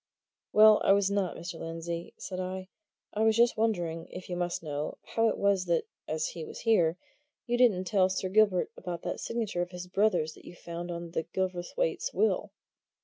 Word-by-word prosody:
"Well, 215 Hz, 0 st, +7 dB
I -, -, +6 dB
was 200 Hz, 0 st, +2 dB
not, 200 Hz, -3 st, 0 dB
Mr. 170 Hz, 0 st, -7 dB
Lindsey," 165 Hz, +1 st, -5 dB
said 185 Hz, -2 st, -6 dB
I. 185 Hz, 0 st, -4 dB, 0.4 s
"I 210 Hz, -, -1 dB
was 220 Hz, 0 st, +4 dB
just 235 Hz, 0 st, +5 dB
wondering 175 Hz, -7 st, -1 dB
if 180 Hz, 0 st, -9 dB
you 180 Hz, -, -2 dB
must 175 Hz, -1 st, -2 dB
know 150 Hz, -1 st, -4 dB, 0.2 s
how 225 Hz, 0 st, +3 dB
it -, -, -2 dB
was 200 Hz, -2 st, +2 dB
that, 170 Hz, -2 st, +2 dB, 0.2 s
as 155 Hz, 0 st, -1 dB
he 165 Hz, -, -7 dB
was -, -, -8 dB
here, 180 Hz, -8 st, +3 dB, 0.5 s
you 240 Hz, -, 0 dB
didn't 235 Hz, -7 st, +4 dB
tell 185 Hz, 0 st, +3 dB
Sir 190 Hz, 0 st, -1 dB
Gilbert 200 Hz, -2 st, +3 dB
about 175 Hz, -2 st, -6 dB
that -, -, -3 dB
signature 220 Hz, -6 st, -2 dB
of 175 Hz, -, -2 dB
his 180 Hz, 0 st, -7 dB
brother's 180 Hz, -4 st, +1 dB
that -, -, -17 dB
you -, -, -10 dB
found 170 Hz, 0 st, -6 dB
on 170 Hz, -1 st, -5 dB
Gilverthwaite's 185 Hz, -, -2 dB
will." 440 Hz, -, +1 dB
185 Hz, 190 wpm, -30 LUFS, 170-210 Hz, 0.5 s, Well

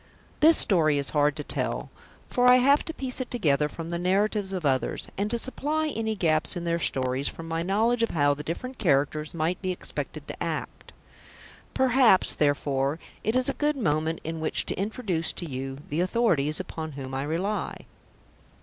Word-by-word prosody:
This 320 Hz, +2 st, +7 dB
story 155 Hz, -7 st, +5 dB
is 140 Hz, -2 st, -1 dB
hard 145 Hz, -1 st, +2 dB
to 150 Hz, -, -5 dB
tell, -, -, -2 dB, 0.4 s
for 250 Hz, 0 st, +2 dB
I 250 Hz, -, +8 dB
have 280 Hz, +3 st, +4 dB
to -, -, -3 dB
piece 260 Hz, -4 st, -3 dB
it 255 Hz, -, -5 dB
together 150 Hz, -, +1 dB
from 165 Hz, +1 st, -7 dB
the 170 Hz, -, -2 dB
narratives 195 Hz, +2 st, +1 dB
of 185 Hz, -4 st, -3 dB
others, 130 Hz, -2 st, 0 dB
and 205 Hz, +2 st, -1 dB
to 235 Hz, -, -1 dB
supply 300 Hz, +5 st, -1 dB
any 220 Hz, -5 st, -2 dB
gaps 160 Hz, -3 st, +2 dB
in 175 Hz, -, -4 dB
their 170 Hz, 0 st, 0 dB
stories 130 Hz, -2 st, 0 dB
from 165 Hz, -, -7 dB
my 165 Hz, 0 st, -2 dB
knowledge 220 Hz, +6 st, +1 dB
of 230 Hz, -, +2 dB
how 145 Hz, -2 st, +2 dB
the 145 Hz, -, -6 dB
different 250 Hz, -, -6 dB
characters 150 Hz, -3 st, +1 dB
might 165 Hz, +3 st, -1 dB
be 185 Hz, -1 st, -1 dB
expected 180 Hz, -, -6 dB
to -, -, -5 dB
act. -, -, -5 dB, 0.8 s
Perhaps, 255 Hz, -6 st, +4 dB
therefore, 145 Hz, -1 st, 0 dB, 0.3 s
it 220 Hz, +3 st, 0 dB
is 255 Hz, 0 st, +2 dB
a -, -, 0 dB
good 295 Hz, -1 st, 0 dB
moment 160 Hz, -, 0 dB
in 160 Hz, 0 st, -4 dB
which 160 Hz, -, -1 dB
to -, -, -2 dB
introduce 195 Hz, -4 st, -2 dB
to 175 Hz, -, -6 dB
you 135 Hz, -1 st, -5 dB
the 155 Hz, +4 st, 0 dB
authorities 180 Hz, -7 st, +1 dB
upon 160 Hz, -4 st, -6 dB
whom 135 Hz, -1 st, -7 dB
I 135 Hz, -, -2 dB
rely. 175 Hz, +9 st, -3 dB
170 Hz, 185 wpm, -26 LUFS, 150-225 Hz, 0.8 s, I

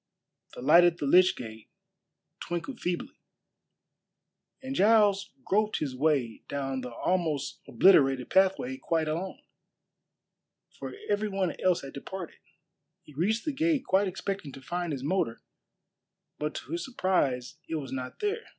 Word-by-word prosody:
The -, -, -8 dB
light 170 Hz, +6 st, +7 dB
at 175 Hz, -1 st, +3 dB
the 145 Hz, -, -3 dB
lych 180 Hz, +6 st, +5 dB
gate 110 Hz, -2 st, -9 dB, 0.7 s
twinkled 175 Hz, +9 st, -5 dB
feebly, 175 Hz, -1 st, -4 dB, 1.4 s
and 265 Hz, +1 st, -4 dB
Giles 205 Hz, -2 st, +4 dB, 0.2 s
groped 215 Hz, +2 st, +1 dB
his 135 Hz, -4 st, -3 dB
way 135 Hz, -5 st, +1 dB
down 135 Hz, -2 st, -3 dB
the 125 Hz, -1 st, -6 dB
almost 150 Hz, -1 st, -1 dB
obliterated 135 Hz, -9 st, +4 dB
pathway 195 Hz, +8 st, +2 dB
quite 165 Hz, -, -1 dB
alone, 170 Hz, +5 st, -4 dB, 1.3 s
for -, -, -8 dB
every 205 Hz, +1 st, +1 dB
one 195 Hz, -3 st, -1 dB
else 185 Hz, -2 st, +2 dB
had 135 Hz, -, -9 dB
departed. 175 Hz, +5 st, -7 dB, 0.6 s
He 150 Hz, -, -16 dB
reached 210 Hz, +10 st, 0 dB
the 305 Hz, -, 0 dB
gate 315 Hz, 0 st, +1 dB
quite 195 Hz, +1 st, +3 dB
expecting 190 Hz, -4 st, -4 dB
to 135 Hz, -, -10 dB
find 175 Hz, +1 st, -3 dB
his 135 Hz, -3 st, -4 dB
motor, 145 Hz, -8 st, -1 dB, 1.0 s
but 150 Hz, +1 st, -2 dB
to -, -, -7 dB
his 340 Hz, +1 st, -2 dB
surprise 155 Hz, -, 0 dB
it 165 Hz, -, -2 dB
was 140 Hz, -4 st, -5 dB
not 130 Hz, -1 st, -6 dB
there. 420 Hz, +2 st, -2 dB
175 Hz, 140 wpm, -29 LUFS, 140-200 Hz, 1.4 s, light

